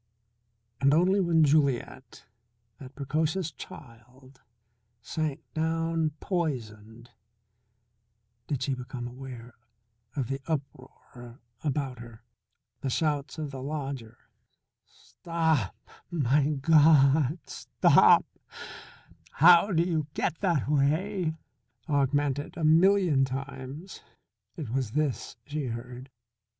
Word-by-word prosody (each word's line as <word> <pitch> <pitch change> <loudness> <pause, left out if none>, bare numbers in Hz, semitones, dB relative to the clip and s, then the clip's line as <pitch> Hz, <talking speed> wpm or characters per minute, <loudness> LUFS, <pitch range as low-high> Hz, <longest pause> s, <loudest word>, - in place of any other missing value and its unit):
And 140 +1 +4
only 185 +4 +3
when 170 -4 +3
Juliet, 140 -4 0 0.5
that 135 -1 -12
precocious 155 +4 -1
child, 130 0 -14 0.6
sank 150 +4 -3
down 165 0 0
poisoned 120 - -4 1.4
did 135 -3 -2
she 135 - -1
become 125 -1 -6
aware 125 -1 -10 0.6
of 135 -5 -2
the 135 +1 -4
uproar 130 -4 -7 0.2
about 140 -4 -2
her. 115 -1 -12 0.6
The 135 - -3
shouts 145 0 -1
of 150 -3 -4
the 135 -2 -7
lodger, 135 -5 -5 0.7
"Stop 160 - -2 0.3
my 145 -3 +2
God, 150 -1 +4
stop! - - +4 1.1
How 175 +5 +6
do 165 -2 +3
you 160 -4 -1
get 160 - -1
that 170 -10 0
way?" 160 +5 0 0.5
augmented 145 0 0
a 165 - -4
million 165 -2 +4
times. 135 +5 -6 0.6
It 145 -9 -6
was 125 -4 -2
this 150 -6 -2
she 150 -1 -4
heard. 125 +2 -7
140 Hz, 95 wpm, -28 LUFS, 130-160 Hz, 1.4 s, How